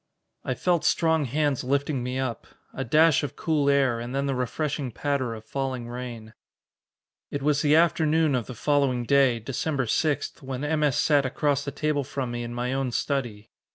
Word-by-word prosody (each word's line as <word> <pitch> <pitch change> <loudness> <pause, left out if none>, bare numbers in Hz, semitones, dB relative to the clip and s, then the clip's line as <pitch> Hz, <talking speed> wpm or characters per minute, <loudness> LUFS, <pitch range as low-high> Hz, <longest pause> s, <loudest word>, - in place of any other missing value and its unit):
I - - -2
felt 175 -3 +1
strong 160 -3 +2
hands 145 +1 0
lifting 140 +1 0
me 125 +1 -3
up. 130 -4 -3 0.3
A 135 - -3
dash 155 +4 +4
of 145 - -5
cool 150 -3 +1
air, 135 -4 +2
and 120 +3 -5
then 140 0 0
the 140 - 0
refreshing 135 +2 -2
patter 130 -1 -2
of 110 0 -11
falling 130 -3 -3
rain. 120 -2 -7 1.0
It 140 -1 -4
was 150 -1 +2
the 150 0 +4
afternoon 160 -2 +3
of 125 -3 -1
the 125 - -7
following 135 +1 +1
day, 135 -1 +3
December 135 +4 -2
6, 145 +5 -1
when 130 0 -5
M. 155 +1 0
S. 145 -3 +2
sat 145 -2 +3
across 145 +2 0
the 140 - -4
table 150 0 -1
from 130 -2 -4
me 120 0 -3
in 120 0 -5
my 120 +1 -2
own 135 -2 -1
study. 120 -6 -3
135 Hz, 190 wpm, -26 LUFS, 125-145 Hz, 1.0 s, dash